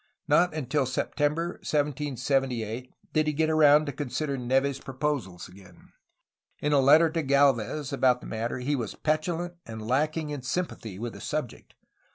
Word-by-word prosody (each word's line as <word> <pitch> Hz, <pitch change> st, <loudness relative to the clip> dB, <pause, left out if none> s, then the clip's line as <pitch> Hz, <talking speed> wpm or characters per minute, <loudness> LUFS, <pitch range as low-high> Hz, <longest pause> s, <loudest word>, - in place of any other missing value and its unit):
Not 175 Hz, -2 st, +3 dB
until 140 Hz, -2 st, 0 dB
September 150 Hz, +6 st, -1 dB
1778 135 Hz, -5 st, -1 dB, 0.2 s
did 155 Hz, -1 st, +2 dB
he 150 Hz, -, +1 dB
get 160 Hz, +2 st, +1 dB
around 150 Hz, -1 st, +6 dB
to 145 Hz, -, -3 dB
consider 140 Hz, +1 st, -3 dB
Neve's 135 Hz, +2 st, 0 dB
proposals 135 Hz, -10 st, -3 dB
again. 90 Hz, -1 st, -17 dB, 0.7 s
In 150 Hz, 0 st, 0 dB
a 145 Hz, -, +5 dB
letter 155 Hz, +4 st, +6 dB
to 165 Hz, 0 st, -1 dB
Gdlvez 140 Hz, 0 st, +2 dB
about 130 Hz, -2 st, +3 dB
the -, -, -12 dB
matter 115 Hz, +3 st, -3 dB
he 135 Hz, +4 st, -1 dB
was 115 Hz, -6 st, -4 dB
petulant 165 Hz, +3 st, -1 dB
and 110 Hz, -1 st, -8 dB
lacking 150 Hz, +4 st, 0 dB
in 145 Hz, -2 st, -4 dB
sympathy 130 Hz, -, -4 dB
with 115 Hz, +2 st, -5 dB
the -, -, -10 dB
subject. 150 Hz, -6 st, -5 dB
140 Hz, 155 wpm, -27 LUFS, 125-150 Hz, 0.7 s, around